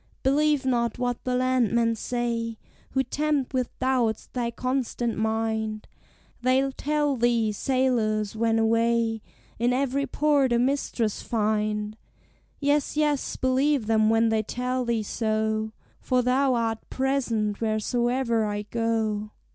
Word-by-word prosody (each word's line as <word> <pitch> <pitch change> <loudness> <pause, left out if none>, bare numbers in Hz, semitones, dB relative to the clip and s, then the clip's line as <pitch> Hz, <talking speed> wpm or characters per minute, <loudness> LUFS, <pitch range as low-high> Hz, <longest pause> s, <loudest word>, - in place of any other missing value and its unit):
"Believe 290 +1 +2
not 235 -3 0
what 245 -1 -2
the 250 -1 0
landmen 240 -2 +2
say 230 -1 -2 0.4
Who 265 0 +2
tempt 285 +1 -1
with 255 -2 0
doubts 250 -4 0
thy 240 -2 -1
constant 245 -1 -2
mind; 220 0 -1 0.5
They'll 260 +2 +2
tell 295 +1 0
thee, 235 -2 +2
sailors, 225 -4 0
when 225 0 +1
away, 230 0 +2 0.4
In 240 +2 +2
every 275 +1 0
port 285 -4 +2
a - - +3
mistress 245 -4 0
find; 210 -1 -1 0.6
Yes, 290 0 +1
yes, 295 -2 +1
believe 260 0 +1
them 220 0 +3
when 225 0 +3
they 220 -1 +2
tell 250 +3 -2
thee 230 -2 0
so, 220 0 -1 0.3
For 255 -1 +1
thou 260 +1 +2
art 225 -1 0
present 240 -6 -1
wheresoe'er 235 +2 0
I 205 0 -2
go. 220 -1 -1
235 Hz, 125 wpm, -26 LUFS, 220-260 Hz, 0.6 s, a